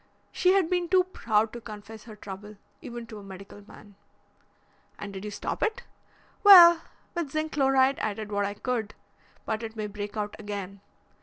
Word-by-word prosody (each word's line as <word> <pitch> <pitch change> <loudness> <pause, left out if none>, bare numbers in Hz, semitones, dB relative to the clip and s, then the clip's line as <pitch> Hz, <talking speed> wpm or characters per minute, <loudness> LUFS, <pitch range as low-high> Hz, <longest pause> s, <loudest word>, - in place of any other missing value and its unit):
She 365 0 +3
had 385 -4 +3
been 355 -1 -1
too 370 0 +5
proud 225 - 0
to 240 - -7
confess 215 0 -10
her 220 -2 -11
trouble, 210 +1 -10 0.2
even 240 -1 -7
to 220 -2 -10
a - - -12
medical 195 +1 -11
man." 205 - -15 1.0
"And 200 -1 -7
did 190 0 -7
you 210 - -4
stop 205 - -5
it?" 435 - -1 0.6
"Well, 345 -4 +10 0.3
with 340 -5 -3
zinc 310 +2 -2
chloride 270 -1 +3
I 210 -2 -2
did 215 0 -7
what 205 0 0
I 205 +1 -4
could. 225 -2 -3 0.5
But 220 0 -2
it 225 -1 -7
may 215 -1 -3
break 205 0 -6
out 210 -1 -3
again. 200 -2 -6
220 Hz, 180 wpm, -27 LUFS, 205-275 Hz, 1.0 s, Well